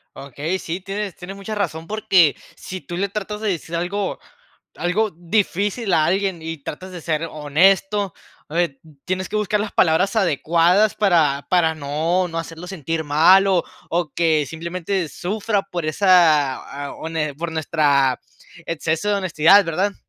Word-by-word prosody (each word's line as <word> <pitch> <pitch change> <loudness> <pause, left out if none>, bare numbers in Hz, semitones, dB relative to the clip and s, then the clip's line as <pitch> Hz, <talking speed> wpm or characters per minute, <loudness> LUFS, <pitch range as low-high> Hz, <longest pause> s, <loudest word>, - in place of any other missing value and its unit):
Okey, 145 +7 -4
sí, 170 +3 -4
tienes 195 +1 -5
tienes 185 +2 -9
mucha 200 +2 -6
razón, 165 -5 -3
porque 190 -8 +3 0.2
si 185 0 -8
tú 175 -1 -7
le 200 +1 -1
tratas 210 +1 -5
de 215 - 0
decir 170 -2 -4
algo 190 +4 -2 0.6
algo 205 +4 0
difícil 200 +4 -1
a 155 - +4
alguien 190 -2 0
y 165 -1 -6
tratas 185 +5 -7
de 175 -2 -8
ser 160 0 -1
honesto, 190 +6 +2 0.4
eh, 165 -5 -1 0.3
tienes 185 0 -2
que 215 - -4
buscar 210 0 0
las 210 0 -3
palabras 180 +6 +2
adecuadas 175 +2 +3
para 160 -9 +2
para 170 -3 +3
no 160 +5 0
no 165 -1 -6
hacerlo 165 +2 -8
sentir 165 -3 -3
mal 170 +7 +5
o 185 -3 +2 0.3
o 170 -4 -1
que 160 -3 +2
simplemente 170 +2 -3
sufra 205 +5 -2
por 175 -2 -5
esa, 155 -5 +2
eh, - - -8
hone 160 -2 -3
por 165 +2 -4
nuestra 145 -4 +2 0.5
exceso 165 +4 -1
de 205 - +2
honestidad, 185 +1 +4
¿verdad? 190 +5 0
175 Hz, 155 wpm, -21 LUFS, 160-195 Hz, 0.6 s, mal